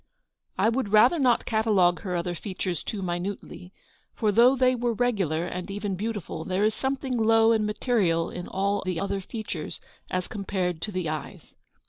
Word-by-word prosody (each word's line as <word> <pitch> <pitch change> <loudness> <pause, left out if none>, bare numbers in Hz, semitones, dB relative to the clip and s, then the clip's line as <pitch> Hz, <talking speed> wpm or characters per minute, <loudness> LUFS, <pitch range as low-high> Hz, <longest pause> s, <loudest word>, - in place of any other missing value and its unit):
I - - +3
would 235 -2 -1
rather 235 +10 +5
not 250 -4 +3
catalogue 210 -6 +3
her 185 -4 -3
other 175 +1 -1
features 185 -1 -4
too 200 -3 -4
minutely; 180 0 -5 0.4
for 215 -2 +1
though 240 +5 +6
they 255 -1 +3
were 240 -1 0
regular, 195 -9 0
and 180 +1 -5
even 200 -1 -3
beautiful, 205 -5 -4
there 190 +3 0
is 215 +1 +3
some 265 +4 -1
thing 265 -2 -3
low 225 0 +5
and 215 -2 +2
material 200 -7 +1
in 180 - -6
all 200 +2 0
the 185 -3 -2
other 200 +1 -2
features 190 -6 -6 0.3
as 185 0 -2
compared 185 -4 -2
to 210 - -3
the 185 -3 -2
eyes. 155 -1 -6
200 Hz, 175 wpm, -26 LUFS, 180-225 Hz, 0.4 s, though